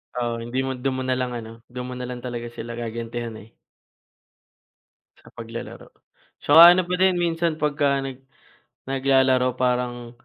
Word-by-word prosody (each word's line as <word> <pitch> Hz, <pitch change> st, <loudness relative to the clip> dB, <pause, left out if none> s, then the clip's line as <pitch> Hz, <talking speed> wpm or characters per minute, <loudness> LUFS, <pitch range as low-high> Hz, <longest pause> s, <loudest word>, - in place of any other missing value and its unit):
Oo, 120 Hz, -1 st, -2 dB
hindi 120 Hz, +3 st, -3 dB
mo 135 Hz, -, -2 dB
do'n 130 Hz, +1 st, -2 dB
mo 130 Hz, -, -3 dB
na 130 Hz, 0 st, 0 dB
lang 125 Hz, -1 st, -2 dB
ano, 110 Hz, -1 st, -7 dB, 0.2 s
do'n 125 Hz, 0 st, -7 dB
mo -, -, -5 dB
na 125 Hz, 0 st, -5 dB
lang 125 Hz, 0 st, -7 dB
talaga 120 Hz, -1 st, -5 dB
sila 115 Hz, +1 st, -7 dB
gagantihan 115 Hz, 0 st, -5 dB
eh 110 Hz, +2 st, -14 dB, 1.7 s
sa -, -, -16 dB
paglalaro. 115 Hz, 0 st, -8 dB, 0.5 s
'Tsaka 155 Hz, +3 st, +7 dB
ano 185 Hz, -, +2 dB
pa 180 Hz, 0 st, -1 dB
din 185 Hz, -1 st, +4 dB
minsan 170 Hz, -2 st, 0 dB
pagka 145 Hz, -2 st, +1 dB
nag 130 Hz, -1 st, -7 dB, 0.7 s
naglalaro 130 Hz, -2 st, +2 dB
parang, 125 Hz, -1 st, -1 dB
125 Hz, 160 wpm, -23 LUFS, 120-135 Hz, 1.7 s, Tsaka